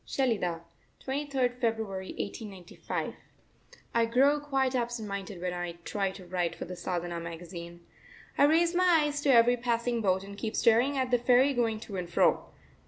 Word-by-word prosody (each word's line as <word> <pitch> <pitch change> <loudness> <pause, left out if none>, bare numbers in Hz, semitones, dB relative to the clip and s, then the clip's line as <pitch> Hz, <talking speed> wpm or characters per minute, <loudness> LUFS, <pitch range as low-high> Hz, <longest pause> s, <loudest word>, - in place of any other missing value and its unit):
SHELIDAH, 200 -11 -1 0.4
23rd 265 -3 -1
February 220 -5 -1
1895. 200 -4 -5 0.8
I 230 0 +3
grow 275 +5 +4
quite 270 -3 0
absent 240 -3 -2
minded 200 -1 -5
when 180 0 -2
I 175 -1 -4
try 195 -2 -1
to 190 -1 -11
write 175 -1 -2
for - - -6
the 180 +1 -7
Sadhana 175 -1 -3
magazine. 170 +1 -8 0.5
I 285 - +5
raise 335 +3 +3
my 355 -3 +4
eyes 290 0 -1
to 290 - 0
every 245 -1 +6
passing 235 0 0
boat 190 -2 +1
and 200 +1 -10
keep 220 -1 -3
staring 245 +5 +3
at 260 -1 -1
the 245 - +4
ferry 255 +3 +4
going 230 -3 0
to 200 -4 -7
and 175 -2 -4
fro. 175 - +2
230 Hz, 170 wpm, -29 LUFS, 185-260 Hz, 0.8 s, every